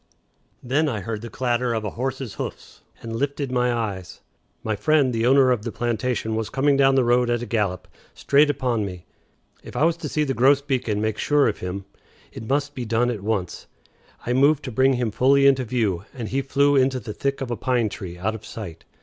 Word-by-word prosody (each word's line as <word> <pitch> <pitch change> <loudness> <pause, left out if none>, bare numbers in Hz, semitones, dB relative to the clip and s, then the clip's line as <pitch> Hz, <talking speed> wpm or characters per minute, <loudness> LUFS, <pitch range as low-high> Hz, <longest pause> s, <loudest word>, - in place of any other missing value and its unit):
Then 145 +5 +1
I 110 -6 -3
heard 110 +1 -4
the 115 - -7
clatter 120 0 -1
of 110 - -2
a 105 - -3
horse's 130 -2 -4
hoofs, - - -7 0.2
and 115 -1 -5
lifted 140 +1 -2
my 125 -1 +1
eyes. 100 -7 -4 0.4
My 110 -1 -1
friend 135 +4 +2
the 115 +1 +1
owner 135 0 +5
of 120 -4 +1
the 115 - -5
plantation 120 -1 -2
was 110 -1 -2
coming 140 +1 +2
down 135 -1 +4
the 130 - +4
road 120 0 +2
at 120 0 0
a - - -3
gallop, 105 -5 -1 0.3
straight 145 +2 +3
upon 125 -6 0
me. 90 -3 -7 0.6
If - - -12
I - - +1
was 165 +1 +2
to 155 -3 -5
see 150 - 0
the 135 -2 -1
grosbeak 135 0 +2
and 105 -1 0
make 110 -1 -1
sure 145 -1 +3
of 110 - -2
him, 95 +2 -5 0.5
it 110 - -9
must 145 +1 0
be 125 - -5
done 120 +2 +1
at 110 -5 -5
once. 100 -4 -3 0.6
I 125 - 0
moved 140 +3 +3
to 130 - -5
bring 130 +3 +3
him 120 -3 -1
fully 135 +5 +4
into 135 -2 +4
view, 105 -7 -1
and 115 -4 -5
he 135 +2 0
flew 140 +1 +2
into 130 -1 +2
the 105 -2 -7
thick 140 +4 -2
of 130 -3 -4
a - - 0
pine 125 -2 0
tree 95 -4 -7
out 100 +5 -1
of 110 - -8
sight. 85 -8 -9
125 Hz, 220 wpm, -23 LUFS, 110-135 Hz, 0.6 s, owner